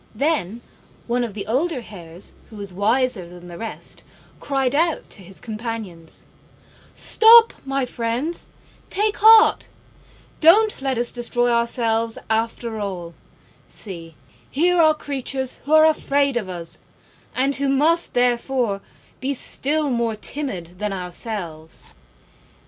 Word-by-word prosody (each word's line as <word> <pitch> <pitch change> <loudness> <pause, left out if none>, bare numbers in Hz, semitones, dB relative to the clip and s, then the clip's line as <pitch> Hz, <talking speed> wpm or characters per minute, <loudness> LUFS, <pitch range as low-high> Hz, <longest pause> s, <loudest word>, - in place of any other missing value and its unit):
Then 240 - -1 0.4
one 245 +1 0
of 220 -4 -5
the 200 -2 -5
older 270 +4 -1
Hares 175 -5 -6 0.2
who 220 - -13
was 200 -3 -7
wiser 215 -1 0
than 175 0 -12
the 170 -1 -9
rest 225 -1 -7 0.4
cried 270 -2 -1
out 330 +2 0
to - - -9
his 190 +1 -11
companions, 215 -7 -7 0.7
"Stop, 460 +1 +6
my 270 -1 -1
friends, 245 +8 -3 0.4
take 415 +2 0
heart; 440 0 +6 0.7
don't 415 +4 +5
let 265 -2 -1
us 240 0 +1
destroy 240 0 0
ourselves 230 -1 0
after 225 0 -2
all: 180 -4 -5 0.5
see, 165 -6 -4 0.3
here 345 +4 +2
are 310 -1 +4
creatures 270 -3 -3
who 295 - -1
are 315 0 +7
afraid 280 -3 +1
of 215 -6 -2
us, 170 -2 -7 0.6
and 270 +2 0
who 280 0 0
must, 315 +5 +2
therefore, 245 -3 0 0.4
be 275 +2 -1
still 295 +3 +2
more 235 -2 -1
timid 190 - -4
than 210 -1 -2
ourselves." 180 -3 -3
240 Hz, 125 wpm, -21 LUFS, 200-280 Hz, 0.7 s, are